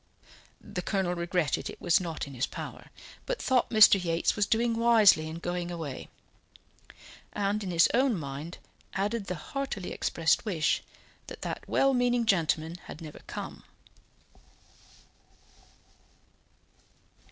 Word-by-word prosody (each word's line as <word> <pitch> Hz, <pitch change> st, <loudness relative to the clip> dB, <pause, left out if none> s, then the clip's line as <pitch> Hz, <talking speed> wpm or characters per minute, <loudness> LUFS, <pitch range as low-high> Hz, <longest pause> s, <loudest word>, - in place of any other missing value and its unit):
The 180 Hz, -, -6 dB
Colonel 190 Hz, -1 st, -1 dB
regretted 170 Hz, -3 st, -1 dB
it -, -, -9 dB
was 175 Hz, -, +3 dB
not 165 Hz, -3 st, -4 dB
in 140 Hz, -, -10 dB
his 130 Hz, 0 st, -1 dB
power, -, -, -8 dB, 0.4 s
but -, -, -2 dB
thought 255 Hz, -3 st, +2 dB
Mr. 210 Hz, -4 st, +7 dB
Yates 165 Hz, -1 st, +1 dB
was 205 Hz, -1 st, +1 dB
doing 230 Hz, +2 st, +2 dB
wisely 225 Hz, -8 st, +5 dB
in 160 Hz, -, -6 dB
going 175 Hz, 0 st, -3 dB
away; 160 Hz, -6 st, -6 dB, 1.2 s
and 205 Hz, +1 st, -1 dB
in 190 Hz, -, -4 dB
his 170 Hz, -1 st, +5 dB
own 255 Hz, -3 st, +3 dB
mind 145 Hz, +4 st, -6 dB, 0.4 s
added 205 Hz, +1 st, -1 dB
the 180 Hz, -, -2 dB
heartily 215 Hz, -, -5 dB
expressed 165 Hz, -1 st, +1 dB
wish 175 Hz, -8 st, 0 dB, 0.5 s
that -, -, -9 dB
that -, -, -5 dB
well 275 Hz, 0 st, +3 dB
meaning 245 Hz, -1 st, +2 dB
gentleman 165 Hz, -4 st, +1 dB
had -, -, -9 dB
never 155 Hz, -3 st, -9 dB
come. -, -, -7 dB
180 Hz, 130 wpm, -29 LUFS, 165-225 Hz, 1.2 s, Mr